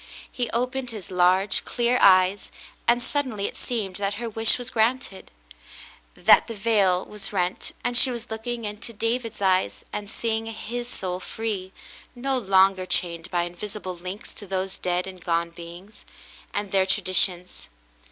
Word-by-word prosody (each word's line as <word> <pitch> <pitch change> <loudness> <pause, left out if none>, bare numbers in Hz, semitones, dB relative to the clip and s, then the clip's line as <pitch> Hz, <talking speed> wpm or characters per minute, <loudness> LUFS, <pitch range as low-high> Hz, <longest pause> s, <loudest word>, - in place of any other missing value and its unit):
He 245 -3 -2
opened 250 +2 -1
his 215 -6 -7
large, 185 +2 +3
clear 240 +1 +1
eyes, 185 +1 +5 0.4
and 240 +1 +4
suddenly 255 -9 -2
it - - -4
seemed 210 -7 -3
that 200 0 -1
her 235 +2 -4
wish 225 0 +4
was 245 -1 -6
granted, 225 -3 0 0.5
— - - -19
that - - +6
the 230 - -6
veil 200 -4 +2
was 210 -2 -6
rent 180 -2 -2
and 245 0 -1
she 255 - +7
was 235 -2 -6
look 220 +1 -6
ing 240 -2 -3
into 210 +3 -6
David's 230 0 -2
eyes 185 - +2
and 205 -1 -4
seeing 225 0 -2
his 240 +2 -5
soul 185 -6 -4
free, 200 -2 -4 0.4
no 265 +2 -1
longer 190 -3 +4
chained 170 -2 -1
by 175 -1 +1
invisible 185 +2 -6
links 185 +4 -7
to 205 - -9
those 190 0 -3
dead 180 0 0
and 185 -2 -10
gone 170 0 0
beings, 175 +5 -12 0.4
and 205 -2 -3
their 190 -1 +3
traditions. 180 -1 +1
200 Hz, 160 wpm, -25 LUFS, 185-230 Hz, 0.5 s, she